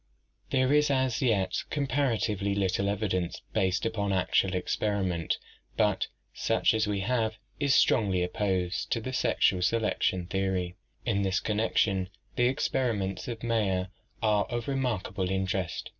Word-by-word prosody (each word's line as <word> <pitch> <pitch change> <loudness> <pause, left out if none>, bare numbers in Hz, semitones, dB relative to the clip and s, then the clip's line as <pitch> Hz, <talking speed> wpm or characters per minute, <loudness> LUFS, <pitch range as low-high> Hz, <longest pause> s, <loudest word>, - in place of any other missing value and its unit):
— 60 - -41
There 130 +1 +2
is 150 0 +4
as 130 -4 +1
yet 100 -7 +1
comparatively 115 -8 0
little 100 0 +1
evidence 95 -4 -1
based 95 +2 +1
upon 105 -3 -1
actual 95 0 +2
experiment, 90 -3 -1 0.4
but - - +2 0.3
such - - +2
as 110 -1 +1
we 100 -1 -1
have 110 0 0 0.2
is 140 -2 +3
strongly 95 -6 +3
opposed 90 -1 -1
to 115 - 0
the 130 +3 -5
sexual 95 -7 +2
selection 95 -3 +1
theory. 95 -1 -1 0.3
In 105 -5 +1
this 95 -1 +1
connection 105 -3 +1 0.3
the 120 - +3
experiments 105 -8 -1
of 115 -2 -5
Mayer 100 -6 0 0.3
are 105 -2 +3
of 120 -1 -4
remarkable 110 -9 -1
interest. 95 -1 -2
100 Hz, 135 wpm, -29 LUFS, 95-115 Hz, 0.4 s, is